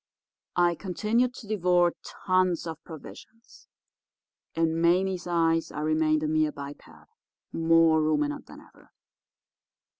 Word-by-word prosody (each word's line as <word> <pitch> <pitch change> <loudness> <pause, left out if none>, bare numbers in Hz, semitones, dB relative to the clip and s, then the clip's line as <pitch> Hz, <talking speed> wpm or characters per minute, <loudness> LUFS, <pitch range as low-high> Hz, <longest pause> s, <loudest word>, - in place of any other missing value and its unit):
I 175 -1 +3
continued 220 +8 -1
to 220 - -11
devour 180 -4 +2
tons 185 -2 0
of 165 -1 -7
provisions. 220 +7 -13 0.9
In 165 0 0
Mame's 180 +1 +1
eyes 165 -1 +1
I - - -5
remained 155 0 +1
a - - 0
mere 155 0 +1
biped, 140 0 -10 0.6
more 165 -1 +4
ruminant 150 -1 -1
than - - -13
ever. - - -21
165 Hz, 115 wpm, -27 LUFS, 155-180 Hz, 0.9 s, more